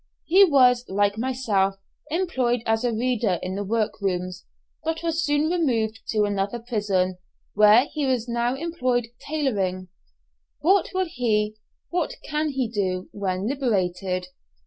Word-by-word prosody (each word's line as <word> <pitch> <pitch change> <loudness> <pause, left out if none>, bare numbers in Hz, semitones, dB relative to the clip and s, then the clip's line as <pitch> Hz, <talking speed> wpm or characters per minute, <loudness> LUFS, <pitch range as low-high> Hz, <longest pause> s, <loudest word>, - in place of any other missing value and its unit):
He 375 +5 +6
was, 255 -8 +5
like 205 +2 +1
myself, 225 -6 0 0.3
employed 260 -9 0
as 225 +1 +1
a 245 - +1
reader 230 -4 0
in 185 - -3
the 200 +1 -3
work 215 +1 -1
rooms, 185 -1 -2 0.4
but 325 +1 -2
was 330 0 0
soon 295 0 +2
removed 230 -10 0
to 215 -1 +1
another 205 +2 -1
prison, 205 -6 -1 0.3
where 210 +4 +6
he 300 -1 -3
is 245 -2 -1
now 240 +1 0
employed 255 -7 -1
tailoring! 195 -12 -2 0.7
What 385 +5 +3
will 375 0 +2
he 215 -8 0 0.4
what 345 -2 -1
can 305 0 -1
he 265 -3 -1
do, 190 -4 -2
when 190 -1 -2
liberated? 190 -8 -1
230 Hz, 140 wpm, -24 LUFS, 200-275 Hz, 0.7 s, He